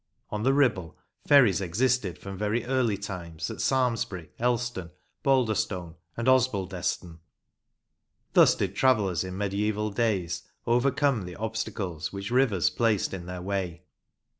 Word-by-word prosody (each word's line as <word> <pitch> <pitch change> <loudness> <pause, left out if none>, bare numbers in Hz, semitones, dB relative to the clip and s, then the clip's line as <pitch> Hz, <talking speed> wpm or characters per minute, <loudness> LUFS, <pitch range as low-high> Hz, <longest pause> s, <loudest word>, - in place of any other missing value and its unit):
On 105 - -2
the 130 +4 +3
Ribble, 115 - +1 0.3
ferries 120 -10 +6
existed 100 0 0
from 100 0 -8
very 105 +4 -1
early 125 -5 +1
times 85 -5 -6
at - - -6
Samlesbury, 115 - 0
Elston, 120 -6 -1 0.3
Balderstone, 110 -9 +1 0.2
and 115 +1 -2
Osbaldeston. 95 -9 0 1.1
Thus - - +6
did 95 -1 -2
travellers 100 - +2
in 95 0 -6
mediaeval 105 +1 -1
days 100 -6 0 0.2
overcome 125 -1 +2
the 90 -1 -8
obstacles 100 -7 -4
which 100 +2 -6
rivers 120 -9 +3
placed 110 -5 +1
in 90 -2 -6
their 90 0 -6
way. 90 -3 -3
100 Hz, 125 wpm, -27 LUFS, 90-120 Hz, 1.1 s, ferries